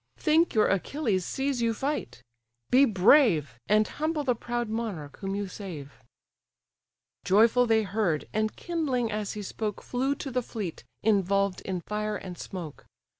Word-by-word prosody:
Think 320 -1 +3
your 215 - +5
Achilles 200 - 0
sees 270 -2 -1
you 230 -1 +1
fight: 210 - -3 0.5
be 265 +3 +7
brave, 185 - +4
And 215 +1 +4
humble 310 0 -2
the 255 -3 +2
proud 240 0 -3
monarch 215 -10 -4
whom 195 0 -3
you 200 0 -2
save." 175 -8 -8 1.3
Joyful 230 +5 +4
they 220 -1 +3
heard, 195 -6 -1
and 215 0 0
kindling 275 -9 -1
as 210 -1 -3
he 210 -1 -5
spoke, 210 +1 -4
Flew 265 +3 -1
to 275 -1 -6
the 250 0 0
fleet, 210 -7 -6 0.2
involved 200 -2 +2
in 185 -2 -3
fire 210 +3 -3
and 185 -2 -8
smoke. 170 -5 -8
215 Hz, 150 wpm, -28 LUFS, 190-250 Hz, 1.3 s, be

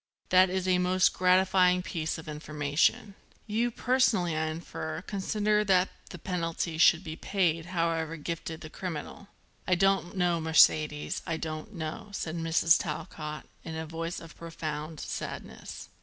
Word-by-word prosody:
That 185 0 +6
is 185 0 -1
a 180 -1 +3
most 180 +1 +3
gratifying 180 0 +4
piece 165 -3 -3
of 160 - -10
information. 150 +5 0 0.3
You, 230 +3 0
personally, 230 -9 +2
I 160 0 0
infer, 160 0 -5
consider 210 +1 0
that 185 -1 +4 0.2
the 180 - -8
penalty 165 -2 -3
should 170 +1 +6
be 160 -2 -6
paid, 165 -3 0
however 165 -2 -1
gifted 165 +1 -5
the 155 - -8
criminal." 180 +2 -6 0.4
"I 185 - +4
don't 195 0 +1
know, 175 -2 +2
Mercedes, 155 -1 +3
I 165 -2 -1
don't 160 +6 -6
know," 160 +5 -5
said 165 -4 -3
Mrs. 165 0 +3
Talcott 150 -4 -5 0.2
in 160 - -6
a 160 0 -4
voice 165 +2 -4
of 165 -1 -12
profound 155 -2 -5
sadness. - - -6
170 Hz, 145 wpm, -29 LUFS, 160-185 Hz, 0.4 s, That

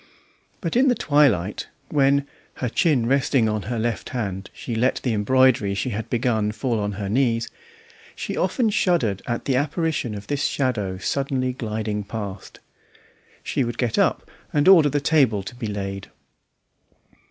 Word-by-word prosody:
But 170 -1 -3
in 260 +3 +4
the 250 - +4
twilight, 130 - +2 0.2
when, 140 -1 +3 0.3
her 125 - -2
chin 145 -4 +2
resting 130 -2 +2
on 110 -1 -1
her 120 - -2
left 115 0 -2
hand, 95 -6 -4
she 120 - -6
let 120 +3 +1
the 125 - 0
embroidery 115 -2 +3
she 100 +6 -2
had 110 +1 -4
begun 115 -4 0
fall 120 -1 -1
on 105 0 -2
her 100 0 -4
knees, 115 +1 +1 0.7
she - - -4
often 230 -4 +1
shuddered 160 - +1
at 120 -1 -3
the 135 - +1
apparition 145 -4 -1
of 100 0 -8
this 145 0 -2
shadow 105 -9 -1
suddenly 130 +3 -1
gliding 110 -3 -3
past. 100 -2 -7 0.8
She 135 - 0
would 120 -1 -4
get 120 -3 0
up - - +1 0.2
and 145 +2 +2
order 170 -6 +7
the 145 - 0
table 135 -10 +3
to 95 - -8
be 120 -2 -5
laid. 100 -1 -5
120 Hz, 160 wpm, -23 LUFS, 105-140 Hz, 0.8 s, order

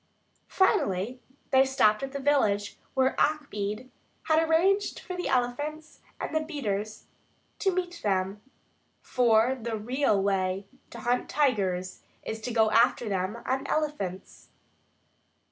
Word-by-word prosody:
Finally 250 - +1 0.3
they 265 0 +6
stopped 240 -6 +3
at 270 0 -4
the 280 - -4
village 220 -8 +1 0.2
where 265 0 +3
Achmed 255 -6 -1 0.3
had 315 0 +3
arranged 355 +5 +2
for 365 - -7
the 360 - -3
elephants 290 +5 -2 0.2
and - - -4
the - - +4
beaters 215 -10 -4 0.5
to 385 - +2
meet 355 -1 -3
them, 195 0 -1 0.6
for 240 0 +3
the 235 -3 -4
real 240 0 +1
way 195 0 0 0.2
to 235 - -9
hunt 245 +2 0
tigers 190 -10 0 0.2
is 220 0 -5
to 245 - -4
go 220 -2 +3
after 235 0 +3
them 195 +3 -2
on 265 +1 -1
elephants. 290 -13 -3
245 Hz, 130 wpm, -28 LUFS, 205-295 Hz, 0.6 s, they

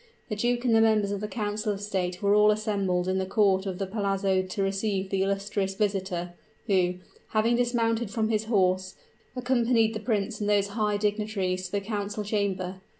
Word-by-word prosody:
The 210 - -2
duke 240 +3 0
and 235 - +3
the 225 - +5
members 215 -2 +3
of 200 -1 -3
the 210 - -2
council 210 -1 -2
of 200 - -4
state 185 -2 -3
were 200 0 +4
all 210 0 +6
assembled 200 -4 0
in 190 0 +1
the 190 - -1
court 195 -1 +2
of 185 -2 -3
the 195 - -2
Palazzo 195 -1 0
to 185 +2 -3
receive 195 0 -1
the 195 -1 +1
illustrious 195 0 -1
visitor, 190 -4 -2 0.3
who, 185 -4 +2 0.3
having 225 +2 +2
dismounted 235 -2 +1
from 220 0 -1
his 220 -1 0
horse, 185 -4 +1 0.4
accompanied 240 -3 +2
the 215 - -3
prince 215 -1 -1
and 205 - 0
those 200 -1 +2
high 210 0 0
dignitaries 205 -3 -1
to - - -17
the 200 - 0
council 205 0 -3
chamber. 195 -3 -2
205 Hz, 190 wpm, -27 LUFS, 190-215 Hz, 0.4 s, all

